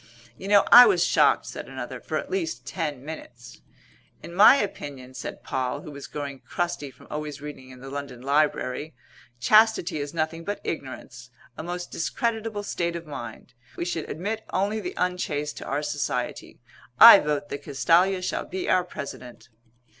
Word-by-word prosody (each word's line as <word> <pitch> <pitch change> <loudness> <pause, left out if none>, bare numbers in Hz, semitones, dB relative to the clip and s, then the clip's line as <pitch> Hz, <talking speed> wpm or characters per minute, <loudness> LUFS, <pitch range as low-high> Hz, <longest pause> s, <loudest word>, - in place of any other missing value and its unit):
"You 190 - -9
know 205 -1 +6
I 245 - +11
was 405 - +3
shocked," - - +3
said - - -8
another, - - -6
"for - - -3
at - - -5
least 340 -4 -3
ten 150 -7 -4
minutes." 125 -6 -10 0.6
"In 170 - -9
my 210 +8 +8
opinion," 140 - -5
said - - -7
Poll, 130 +2 -2
who 150 - -10
was 140 -1 -9
growing 140 -2 -6
crusty 175 -3 -3
from 130 - -18
always 150 -1 -5
reading 145 -3 -9
in 130 -1 -13
the 135 - -8
London 140 -3 -6
Library, 145 +1 0 0.4
"chastity 215 - +4
is 145 0 -4
nothing 165 0 -2
but 205 +4 -4
ignorance 130 -4 -7 0.3
a - - -6
most 175 +2 -5
discreditable 220 +3 -2
state 170 -4 -2
of 170 0 -6
mind. 125 -4 -9 0.2
We 170 - -2
should 165 -3 -3
admit 210 +7 -4
only 205 +3 0
the 365 - -6
unchaste 155 -5 -2
to - - -7
our 145 +2 -2
society. 140 -4 -3 0.4
I 230 -3 +12
vote 145 -1 -2
that 140 - -5
Castalia 180 +6 +2
shall - - -2
be 185 0 -5
our 185 -1 +3
President." 140 -8 -9
155 Hz, 170 wpm, -25 LUFS, 140-185 Hz, 0.6 s, I